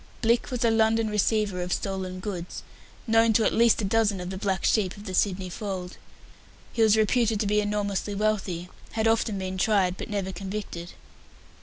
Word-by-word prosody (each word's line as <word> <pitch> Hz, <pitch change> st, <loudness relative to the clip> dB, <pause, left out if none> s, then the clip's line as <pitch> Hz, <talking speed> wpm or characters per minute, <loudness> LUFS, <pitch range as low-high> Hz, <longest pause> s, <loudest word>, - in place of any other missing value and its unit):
Blicks 230 Hz, +1 st, +2 dB
was 250 Hz, -2 st, -1 dB
a 230 Hz, -, +4 dB
London 225 Hz, 0 st, +2 dB
receiver 210 Hz, -2 st, +1 dB
of 180 Hz, 0 st, -4 dB
stolen 190 Hz, -1 st, -3 dB
goods, 180 Hz, -3 st, -5 dB, 0.4 s
known 225 Hz, -1 st, +4 dB
to 220 Hz, +1 st, +3 dB
at -, -, +2 dB
least 230 Hz, -1 st, +4 dB
a -, -, +1 dB
dozen 210 Hz, -1 st, +2 dB
of 180 Hz, +1 st, -5 dB
the 190 Hz, -, -5 dB
black 190 Hz, -2 st, -1 dB
sheep 205 Hz, -3 st, +1 dB
of 205 Hz, -, -11 dB
the 190 Hz, -, -5 dB
Sydney 185 Hz, -1 st, +1 dB
fold. 180 Hz, -1 st, -5 dB, 0.8 s
He 230 Hz, -, 0 dB
was 220 Hz, -1 st, +5 dB
reputed 220 Hz, 0 st, +2 dB
to 215 Hz, -, 0 dB
be 210 Hz, +1 st, +2 dB
enormously 205 Hz, -1 st, -2 dB
wealthy, 195 Hz, -4 st, -1 dB, 0.3 s
had 225 Hz, 0 st, +1 dB
often 225 Hz, -2 st, +1 dB
been 185 Hz, 0 st, -4 dB
tried, 190 Hz, -3 st, +2 dB
but -, -, -6 dB
never 200 Hz, -2 st, -2 dB
convicted. 190 Hz, -2 st, -6 dB
205 Hz, 185 wpm, -26 LUFS, 190-220 Hz, 0.8 s, was